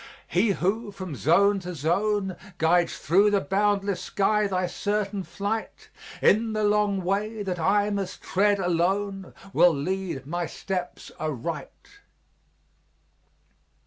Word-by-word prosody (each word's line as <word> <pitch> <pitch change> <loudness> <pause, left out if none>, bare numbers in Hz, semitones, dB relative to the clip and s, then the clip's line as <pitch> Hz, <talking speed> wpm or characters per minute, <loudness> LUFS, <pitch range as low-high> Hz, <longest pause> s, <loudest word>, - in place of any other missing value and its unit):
He 195 +4 +2
who, 205 +5 -1
from 185 -6 -7
zone 195 +8 +3
to 180 -1 -6
zone, 190 +5 0 0.2
Guides 170 +1 +2
through 195 +6 +4
the 205 -1 +2
boundless 200 -1 0
sky 210 +1 +1
thy 185 -2 0
certain 205 +2 -2
flight, 205 +4 -4 0.3
In 220 +2 +4
the 215 0 0
long 205 -2 +2
way 205 +4 -1
that 180 -3 -3
I 205 +5 +2
must 195 -2 -4
tread 205 +2 +2
alone, 190 +2 -1 0.2
Will 175 -3 +5
lead 175 -2 -3
my 170 +3 -2
steps 180 0 -5
aright. 155 - -5
195 Hz, 120 wpm, -26 LUFS, 175-205 Hz, 0.3 s, Will